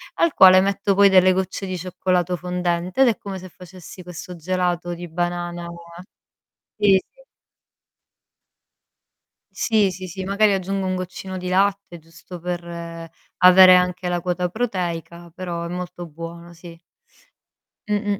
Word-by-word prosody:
al 335 -3 +2
quale 185 0 +8
metto 200 0 0
poi 200 0 +6
delle 185 -1 +5
gocce 190 +1 -3
di 185 -1 -4
cioccolato 180 0 -1
fondente 180 +3 -2
ed 265 - +6
è 225 - -1
come 195 -2 -7
se 185 +1 -11
facessi 180 0 -13
questo 180 +1 -9
gelato 175 0 -2
di 175 0 -8
banana 175 0 -3 1.1
sì, 200 -2 +5
sì. - - -24 2.3
Sì, 215 -4 +1
sì, 185 +1 -8
sì, 190 +2 -6
magari 200 +2 +2
aggiungo 195 0 -2
un 185 - -1
goccino 185 +1 -6
di 180 0 -6
latte, 195 -1 0
giusto 165 +2 -12
per 175 0 -4 0.7
avere 185 0 +8
anche 180 0 0
la 175 0 -1
quota 180 0 -2
proteica, 175 -5 -4
però 175 -2 -5
è - - -4
molto 175 0 -6
buono 170 +2 -10
sì. 170 0 -13 1.1
Mh-mh. 205 -1 -1
180 Hz, 140 wpm, -22 LUFS, 175-190 Hz, 2.3 s, quale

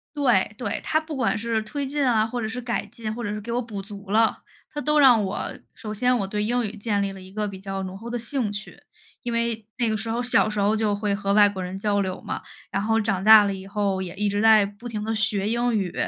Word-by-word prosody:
对， 245 -9 +2
对， 210 -4 -3
它 315 - +2
不 315 -1 -7
管 260 -4 +1
是 225 0 -1
推 275 +7 -4
进 285 +1 0
啊， 220 -3 +3
或 240 +2 -4
者 220 - -2
是 225 +3 -5
改 240 -3 -2
进， 220 0 -6
或 240 +2 -5
者 205 - -2
是 210 - -3
给 220 +3 -6
我 245 +1 0
补 220 -5 -6
足 200 0 -11
了， 220 +2 +3 0.3
它 295 - -3
都 300 0 +2
让 250 -6 +7
我 195 +1 -3 0.2
首 215 -2 -6
先 250 +4 +2
我 195 - -2
对 210 +1 -2
英 240 +3 +1
语 210 +1 -5
建 205 -1 -1
立 200 0 -1
了 195 -1 -10
一 185 - -13
个 210 +1 -2
比 195 -1 -7
较 195 0 -4
浓 185 0 -6
厚 230 +3 -8
的 240 - -2
兴 235 -1 -2
趣， 205 +1 -8 0.4
因 240 - -4
为 230 -2 -1
那 240 - +1
个 220 - 0
时 220 +2 -4
候 230 +2 -1
小 245 -3 +4
时 210 -1 -3
候 205 +2 +3
就 215 -2 +1
会 205 0 -1
和 200 0 0
外 205 0 +7
国 195 -2 -4
人 180 +1 -5
交 205 0 +1
流 185 -1 -3
嘛， - - -5 0.3
然 195 - 0
后 225 +1 +2
长 200 -4 -1
大 215 0 +9
了 200 -1 0
以 190 0 -8
后 200 -2 -1
也 185 -1 -6
一 205 +1 0
直 205 0 0
在 220 -2 +6
不 205 +4 -9
停 210 -2 -4
地 220 +1 -1
学 210 -2 +1
英 235 +1 +1
语， 190 -4 -2
215 Hz, 295 characters per minute, -24 LUFS, 200-235 Hz, 0.4 s, 大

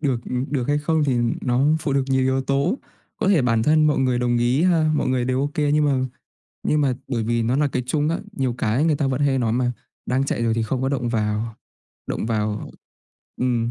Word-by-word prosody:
được, 135 -6 0
ừm, 125 0 -2
được 130 -2 -1
hay 145 0 +2
không 155 0 +1
thì 130 -4 +1 0.2
nó 125 +2 +1
phụ 150 -3 -1
thuộc 135 -1 +1
nhiều 130 -1 +2
yếu 130 0 +1
tố. 140 - 0 0.4
Có 205 - 0
thể 170 -9 +4
bản 115 -2 +2
thân 155 +2 +4
mọi 150 - +2
người 130 -2 +1
đồng 120 -1 +1
ý 125 +6 +2
ha, 165 -4 +3
mọi - - 0
người 130 -1 +1
đều 130 +1 0
ok, 145 +1 -2 0.2
nhưng 150 0 +3
mà 140 -2 +2 0.6
nhưng 150 - +1
mà 135 -3 +2
bởi 120 -4 -1
vì 115 +1 0
nó 120 +4 +1
là 145 -1 +2
cái 130 -1 -2
chung 145 +3 0
á, 165 - 0
nhiều 130 -8 -1
cái 115 +8 +1
người 155 -3 +2
ta 140 - 0
vẫn 135 +1 -1
hay 140 -2 +2
nói 115 -3 0
mà, 125 +1 +1 0.3
đang 130 +2 +1
chạy 120 - -2
rồi 115 -1 +1
thì 115 - 0
không 130 +3 -2
có 135 - +1
động 135 -3 -1
vào, 110 0 -1 0.5
động - - -3
vào 105 -2 -2 0.7
ừm. 120 -2 0
130 Hz, 240 wpm, -22 LUFS, 120-145 Hz, 0.7 s, thể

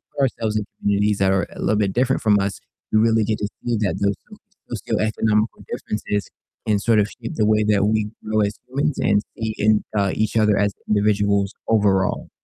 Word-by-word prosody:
put 140 - -1
ourselves 110 -4 -1
in 105 - -2 0.2
communities 100 0 +1
that 95 0 +3
are 95 0 +1
a - - -12
little 110 - +1
bit 100 -2 0
different 130 +2 +1
from 105 -2 +4
us, 100 0 -2 0.3
we 110 - +4
really 110 0 +3
get 110 0 -1
to 105 - -1 0.2
see 120 -1 0
that 100 -5 -1
those 100 -1 +2 0.6
socioeconomical 110 0 0
differences 105 -1 -3 0.4
can 105 -2 +2
sort 110 +1 +3
of 105 - +2
shape 115 -1 -8
the 110 - +2
way 110 0 +3
that 105 -1 +2
we 110 -1 +1 0.2
grow 110 0 0
as 100 0 -1
humans 140 +3 -1
and 105 0 +3 0.2
see 110 -1 -2
in, 105 0 +3
uh, 100 -2 +2
each 110 +1 -1
other 105 -2 +3
as 100 -1 +1 0.2
individuals 100 -1 +2
overall. 100 -4 +1
105 Hz, 200 wpm, -21 LUFS, 100-110 Hz, 0.6 s, from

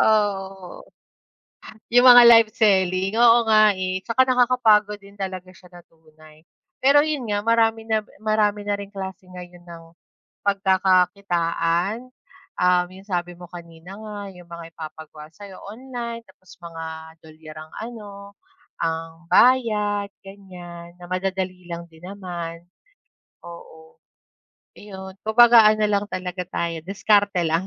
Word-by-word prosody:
Oo. 195 -4 -1 1.1
'Yong 245 +1 +5
mga 245 -1 +9
live 230 -2 +6
selling. 190 -4 +1
Oo 235 0 +6
nga, 215 -1 +5
eh. 185 0 -3
Tsaka 240 +3 +2
nakakapagod 235 -5 +2
din 200 0 -17
talaga 185 -2 -6
siya 180 0 -19
na 175 - -14
tunay. 155 -1 -21 0.4
Pero 280 +2 +5
'yon 300 -5 -3
nga, 205 -1 -1
marami 225 -1 +1
na 220 -1 +1 0.2
marami 210 -1 +1
na 205 0 0
ring 200 0 -9
klase 190 -1 -7
ngayon 180 -1 -12
ng 170 -1 -12 0.6
pagkakakitaan, 190 0 0 0.5
ah, 180 0 +3
'yong 190 +2 -15
sabi 175 -2 -3
mo 175 -1 -12
kanina 170 +1 -12
nga, 215 -1 -9 0.2
'yong 175 -1 -15
mga 170 -1 -9
ipapagawa 155 -1 -10
sa'yo 200 -1 -12
online 235 +1 -7
tapos 185 - -19
mga 165 -1 -8 0.4
dolyar 155 0 -14
ang 155 0 -13 0.2
ano, 210 -4 -11 0.7
ang 165 0 -4
bayad, 210 -5 +3 0.2
ganyan 175 -3 -12
na 175 - -11
madadali 185 -1 -4
lang 170 0 -7
din 160 +1 -20
naman. 175 -4 -7 0.8
Oo, 160 -2 -14 0.8
iyon. 190 -2 -10
Kumbaga 230 0 +6
ano 215 0 0
lang 205 -1 0
talaga 180 0 -5
tayo, 170 -2 -3
diskarte 200 -1 +1
lang 165 +4 -1
190 Hz, 130 wpm, -22 LUFS, 175-215 Hz, 1.1 s, mga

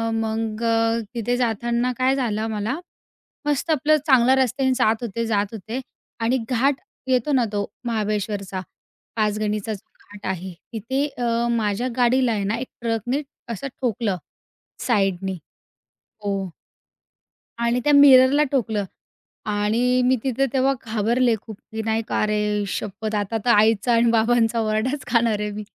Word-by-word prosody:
मग 225 0 -2
अ, 230 0 +2 0.2
तिथे 240 +1 0
जाताना 240 +1 0
काय 260 +1 +2
झालं 220 -5 -1
मला. 220 +6 -2 0.7
मस्त 295 +2 0
आपलं 305 +1 +3
चांगल्या 260 -1 +5
रस्त्याने 260 +1 +1
जात 225 -2 +2
होते, 230 0 -2
जात 210 -2 +1
होते 225 +4 -5 0.4
आणि 240 +3 +2
घाट 265 +2 +1 0.3
येतो 255 +2 +2
ना 255 -3 +3
तो 205 -1 -1 0.2
महाबळेश्वरचा. 205 -4 -2 0.6
पाचगणीचा 215 0 -1
जो 200 - -9 0.2
घाट 205 0 -9
आहे. 185 0 -5 0.2
तिथे 260 +6 -1
अ, 235 -1 +1
माझ्या 215 +3 0
गाडीला 250 0 +3
आहे 205 -2 -1
ना, 210 +3 0
एक 255 - -5
ट्रकने 235 +4 -1 0.3
असं 250 +6 -5
ठोकलं 230 -5 0 0.7
साईडनी. 195 -5 0 0.9
हो. 195 -2 -2 1.1
आणि 235 +1 +1
त्या 295 - +3
मिररला 280 0 +7
ठोकलं 220 -6 0 0.7
आणि 225 +5 +2
मी 260 - +4
तिथं 265 +1 +1
तेव्हा 270 +1 +3
घाबरले 230 +2 +2
खूप 220 -3 -10
की 220 0 -3
नाही 225 0 +1
का, - - 0
अरे 210 -1 0
शप्पथ! 215 +2 -4
आता 205 +2 -1
तर - - +2
आईचा 220 +2 +4
आणि 230 0 +4
बाबांचा 230 0 +2
ओरडाच 220 +6 -1
खाणार 230 -3 +2
आहे 210 0 -2
मी 210 +1 -6
225 Hz, 140 wpm, -23 LUFS, 210-250 Hz, 1.1 s, मिररला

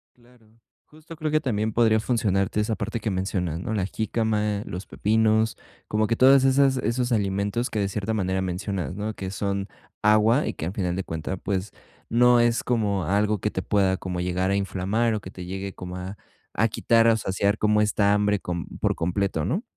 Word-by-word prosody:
Claro, 120 -2 -24 0.4
justo 155 +2 -13
creo 155 -1 -3
que 155 - +3
también 110 -6 -1
podría 110 -1 +3
funcionarte 105 -4 0
esa 110 +1 0
parte 110 +1 -3
que 110 - -2
mencionas, 95 -4 -2
¿no?, 110 - -3
la 100 -4 0
jícama, 105 -1 -1
los 90 +2 -6
pepinos, 110 +1 +1 0.3
como 110 +1 +1
que 115 +1 0
todas 135 +1 +6
esas 135 0 +4
esos 125 +2 -1
alimentos 100 +3 0
que 110 - -2
de 100 - +1
cierta 105 +2 -3
manera 95 -3 0
mencionas, 95 0 -3
¿no?, 105 +2 -3
que 95 -2 -6
son 100 0 -2 0.3
agua 110 +5 +4
y - - -2
que, - - -5
al 90 - -3
final 90 -4 -1
de 95 - -2
cuenta, 80 +3 -4
pues, 95 +1 -3 0.4
no 120 +1 +5
es 120 0 +2
como 105 -7 0
algo 105 +4 +1
que 105 - -1
te 95 - -3
pueda 95 -1 +2
como 90 -1 -5
llegar 90 +1 0
a - - +2
inflamar 100 +4 0
o 105 - -2
que 95 - -9
te 90 -1 -8
llegue 95 +1 -5
como 90 0 -8
a 95 +3 -7 0.4
a 115 - +2
quitar 115 +1 +3
o - - +6
a - - +2
saciar 100 0 0
como 105 0 +2
esta 105 -1 +2
hambre 105 0 +2
con 85 0 -4
por - - +1
completo, 90 -2 -1
¿no? 180 - -1
105 Hz, 205 wpm, -25 LUFS, 95-115 Hz, 0.4 s, todas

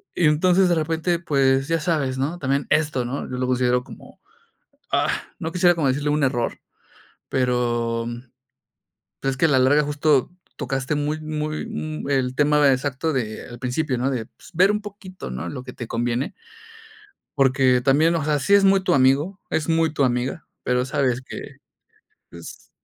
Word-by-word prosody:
Y 175 - +2
entonces, 180 +5 +4
de 175 - +2
repente, 165 +2 0
pues, 135 -4 +2
ya 165 0 +1
sabes. 150 -6 -1
¿No? 150 +6 -2
También 140 -1 -1
esto. 150 -5 +1
¿No? 130 +4 -4
Yo 125 - -3
lo 125 - -1
considero 125 -1 +2
como, - - -14 0.7
ah, - - +2 0.3
no 160 - -4
quisiera 175 0 +4
como 155 -5 0
decirle 145 +3 0
un 150 -1 +1
error. 120 -3 -1 0.7
Pero 120 -2 0 1.2
es 135 -1 -1
que 135 - 0
a - - 0
la 135 -3 +3
larga 140 +4 +4
justo 145 -1 +1 0.3
tocaste 135 +1 -2
muy 150 +2 -2
muy 155 0 -3 0.4
el 130 -2 0
tema 150 0 +4
exacto 140 +4 -1
de 110 -5 -3
al 120 -1 -10
principio, 130 +1 -1
¿no? 130 +2 0
De, 120 -5 -3
pues, - - -18
ver 185 +5 +4
un 210 - -1
poquito, 195 - -9
¿no? 65 +7 -5
Lo 125 - -6
que - - -9
te 115 - -7
conviene, 120 +3 -2 1.0
porque 135 -2 +3
también, 155 +6 +3
o 160 - -1
sea, 150 -1 +1
sí 200 - +1
es 200 0 +6
muy 195 0 +5
tu - - +2
amigo, 140 +8 +2
es 155 - -1
muy 160 -1 +2
tu 145 - +1
amiga, 125 +5 -2 0.2
pero 125 0 +1
sabes 130 -2 0
que, 130 - -9 0.7
pues, 85 -1 -12
140 Hz, 175 wpm, -22 LUFS, 125-160 Hz, 1.2 s, es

